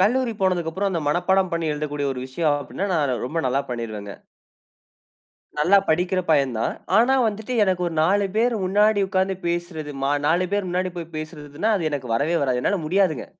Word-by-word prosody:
கல்லூரி 235 +4 +2
போனதுக்கு 180 -3 +1
அப்புறம் 195 +3 -1
அந்த 170 - -1
மனப்பாடம் 185 +4 +2
பண்ணி 170 -1 -1
எழுதக்கூடிய 145 -1 -3
ஒரு 125 - -6
விஷயம் 145 +2 0
அப்டின்னா 165 +8 -4
நா 165 - +2 0.3
ரொம்ப 165 +5 -3
நல்லா 135 +2 +1
பண்ணிருவேங்க. 110 -4 -5 1.4
நல்லா 185 +7 +5
படிக்கிற 180 +3 +2
பையன் 140 -5 +3
தான். 115 - -1 0.2
ஆனா 245 +4 +5
வந்துட்டு 220 +4 -5
எனக்கு 185 -2 0
ஒரு 170 - -3
4 200 +4 +3
பேர் 235 +1 +2
முன்னாடி 205 +2 +3
உட்காந்து 190 -1 0
பேசுறது 170 -3 -3
மா 140 - +2 0.2
4 175 +3 +2
பேர் 200 -3 0
முன்னாடி 185 +1 -1
போய் 165 -1 -8
பேசுறதுன்னா 155 +5 -4
அது 160 -4 -1
எனக்கு 130 -5 -3
வரவே 150 +8 +1
வராது. 125 -2 +1
என்னால 205 - +1
முடியாதுங்க. 185 -1 +1
175 Hz, 175 wpm, -23 LUFS, 145-195 Hz, 1.4 s, நல்லா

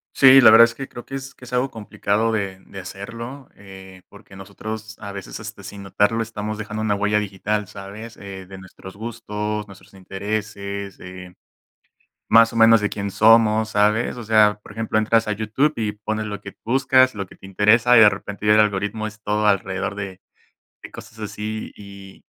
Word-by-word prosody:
Sí, 135 0 +8
la 110 - +8
verdad 115 +1 +9
es 115 0 -5
que 135 +1 -7
creo 120 - -11
que 135 - -6
es 135 0 -7
que - - -20
es 125 - -12
algo 125 +2 0
complicado 110 0 -1
de 100 -3 -3
de 95 - -10
hacerlo, 115 +8 -8
eh, 95 -2 -13
porque 100 -1 -16
nosotros 110 +3 -8
a 100 -1 -7
veces, 100 -1 -8
este, - - -9
sin 100 -1 -9
notarlo, 105 +4 0
estamos 110 -1 -5
dejando 110 +1 -5
una 105 -2 +1
huella 105 +1 +1
digital, 105 0 -2
¿sabes? 100 +3 -10
Eh, 95 -1 -9
de 95 +1 -11
nuestros 95 0 -13
gustos, 105 -1 -5
nuestros 100 0 -16
intereses, 100 0 -5
eh, 90 0 -10 0.9
más 115 +1 +6
o 115 - -5
menos 115 -1 +6
de 105 - 0
quién 100 -1 -4
somos, 110 0 +4
¿sabes? 105 +4 +1
O 120 - -7
sea, 105 -1 +4
por 105 - -13
ejemplo, 110 0 -2
entras 110 0 +1
a - - +1
YouTube 110 +8 0
y 110 -2 -2
pones 110 +1 -4
lo 105 -1 -6
que 100 - -10
buscas, 130 +1 +3
lo 100 -1 -4
que - - -17
te - - -14
interesa, 105 +5 +4
y - - +8
de 105 - +9
repente 105 +1 -7
ya 105 - +5
el - - +5
algoritmo 105 +1 0
es 105 0 -12
todo 105 0 0
alrededor 95 0 0
de 100 -2 -7 0.6
de - - -10
cosas 115 - -12
así. 105 +1 -5
Y 100 -1 -13
105 Hz, 195 wpm, -21 LUFS, 100-110 Hz, 0.9 s, verdad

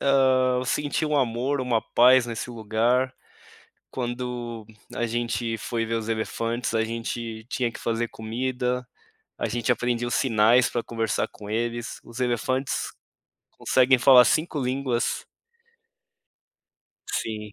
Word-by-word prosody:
Ah, 130 -2 +3
eu - - -4
senti 145 +4 -1
um 150 -1 0
amor, 130 +2 0
uma 120 -3 +1
paz 125 +1 +5
nesse 115 +1 -5
lugar, 120 +3 +1 0.8
quando 120 -2 -4 0.3
a 120 - -1
gente 115 0 -2
foi 115 0 -3
ver 115 - -2
os 115 0 -2
elefantes, 115 +1 -2
a 110 0 +2
gente 115 0 -5
tinha 125 -3 -1
que - - -9
fazer 115 0 -1
comida, 125 +3 -2 0.5
a - - -1
gente 120 +1 0
aprendia 120 0 0
os 120 - -1
sinais 115 0 +4
pra 120 - -2
conversar 115 -1 -1
com 105 - -12
eles. 120 +1 -2
Os 120 +1 -10
elefantes 130 +2 -1 0.6
conseguem 130 0 +3
falar 125 0 +7
5 155 -1 +1
línguas. 130 -2 -1 1.9
Sim. 105 - -3
120 Hz, 130 wpm, -25 LUFS, 115-130 Hz, 1.9 s, falar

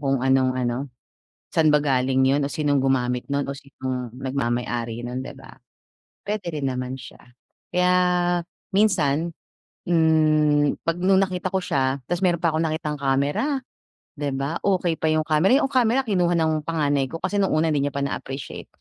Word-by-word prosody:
kung 135 -3 0
anong 130 -1 +3
ano, 120 -1 -1 0.8
saan 160 -2 +4
ba 150 - +5
galing 130 -2 +1
'yon 140 +2 +2
o 140 - -2
sinong 145 -3 +1
gumamit 125 -2 +1
no'n, 140 0 0
o 140 - -4
sinong 130 -3 -5
nagmamay-ari 120 -3 -2
no'n, 125 +1 -4
'di - - -8
ba. - - -13 0.7
Puwede 200 -6 -3
rin 140 -2 -1
naman 125 0 -4
siya, 125 - -12 0.5
kaya 180 0 +3 0.8
minsan, 170 -6 +2 0.6
hmm, 155 -3 +3
pag 165 0 0
no'ng 190 +1 +4
nakita 185 -1 -1
ko 190 - +1
siya, 135 -5 0
tapos 175 +1 -1
meron 170 -2 +1
pa 170 - +3
akong 160 +1 +1
nakitang 155 -1 -2
camera, 140 - 0 0.6
'di 145 -2 -1
ba. 140 +5 -2
Okay 185 -4 +1
pa 160 - 0
'yong 155 0 +2
camera, 155 +4 +3
o, - - +6
'yong 270 - -1
camera 250 0 +3
kinuha 180 -7 +1
ng 160 -2 +1
panganay 145 -4 +1
ko 165 +5 -7
kasi 200 +2 0
no'ng 195 - +2
una 160 +1 +2
'di 145 -1 +1
niya - - -5
pa 140 - -1
na-appreciate, 135 0 -5
150 Hz, 175 wpm, -23 LUFS, 135-170 Hz, 0.8 s, o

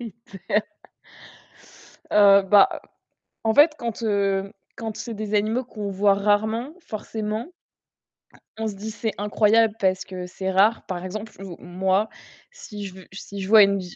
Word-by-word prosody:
le 235 -2 -6 0.6
critère. 310 - -27 1.2
Heu, 200 -1 +6
bah, 200 +1 +4 0.6
en 220 - +3
fait, 300 +5 +7
quand, 235 -1 -5
heu, 200 -2 0 0.3
quand 225 -2 -5
c'est 225 +2 -6
des 215 0 -4
animaux 220 +5 +1
qu'on 210 -4 -6
voit 195 +1 +3
rarement, 215 +6 0
forcément 215 - -5 1.1
on 225 0 -2
se 210 - -5
dit: 215 +3 -6
«C'est 220 0 -3
incroyable, 210 +2 +3
parce 190 -1 +1
que 185 -1 -7
c'est 190 +1 -4
rare». 205 +4 +3
Par 180 -1 -4
exemple, 215 +4 -6
ou 190 -3 -8
moi, 190 +4 0 0.4
si 210 - -9
je 190 - -8
v 190 - -13
si 200 +1 -8
je 190 - -4
vois 215 0 +8
une 200 0 +2
vi 180 -1 -9
205 Hz, 160 wpm, -23 LUFS, 195-220 Hz, 1.2 s, vois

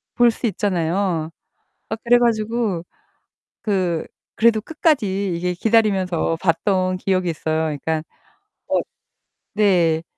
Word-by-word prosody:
볼 240 -1 +5
수 235 - -3
있잖아요. 180 -4 -1 0.6
아 220 - -2
그래 245 +1 +5
가지고 225 -5 0 0.8
그 185 -6 0 0.3
그래도 225 -1 +4
끝까지 210 - 0
이게 180 +1 -1
기다리면서 190 -5 +1
봤던 185 +1 +1
기억이 185 -1 0
있어요. 160 0 -1
그러니까 155 +1 -2 0.6
어 - - +2 0.7
네. 175 -6 +3
190 Hz, 235 characters per minute, -21 LUFS, 170-220 Hz, 0.8 s, 볼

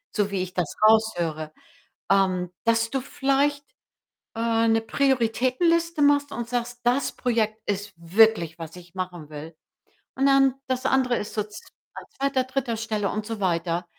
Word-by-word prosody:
so 205 -2 0
wie 190 -2 -1
ich 185 0 -5
das 175 -4 -2
raushöre, 175 -9 +2 0.6
ähm, 185 -2 +2
dass 230 0 +2
du 270 -1 -1
vielleicht, 280 +2 0 0.7
äh, 230 0 +1
‘ne 225 0 +3
Prioritätenliste 275 +7 +1
machst 285 0 +3
und 235 -1 -4
sagst: 240 0 -3
„Das 245 +3 +1
Projekt 220 -3 -1
ist 200 +1 -3
wirklich, 170 -1 +3
was 165 0 -8
ich 175 0 -14
machen 175 -4 -5
will.“ 155 +2 -9 0.6
Und 270 - +1
dann 270 -1 +4
das 260 0 -2
andere 260 -2 +2
ist 210 - -5
so 210 - 0
zw 210 - -11 0.3
an - - -9
2., 270 -1 +1
3. 255 -3 -2
Stelle 215 -3 -2
und 215 0 -3
so 225 -2 -5
weiter. 170 -1 0
225 Hz, 160 wpm, -25 LUFS, 185-260 Hz, 0.7 s, dann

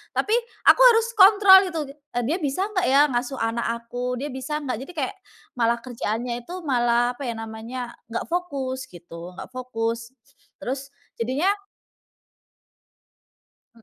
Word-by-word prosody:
tapi - - 0 0.3
aku - - +7
harus 460 -1 +5
kontrol 395 -1 +9
gitu. 330 -3 -3
"D - - -8 0.3
Dia 300 +9 0
bisa 290 +4 -1
nggak 365 -3 0
ya 275 +2 +6
ngasuh 245 +2 -1
anak 230 +1 -1 0.2
aku? 245 +1 -3
Dia 275 +4 -4
bisa 265 +3 -4
nggak?" 255 -5 -3
Jadi - - -9
kayak 280 +4 -2 0.4
malah 235 0 +2
kerjaannya 240 0 -3
itu 355 - -6
malah 240 -3 +2
apa 275 - -5
ya 235 - -3
namanya, 225 +2 -6 0.2
nggak 230 0 -4
fokus 270 -7 -3
gitu, 175 0 -11
nggak - - -9
fokus. 230 -1 -4 0.5
Terus 270 +2 -4 0.3
jadinya 260 +10 +1 2.3
Mmm. 230 - -20
255 Hz, 145 wpm, -24 LUFS, 235-285 Hz, 2.3 s, kontrol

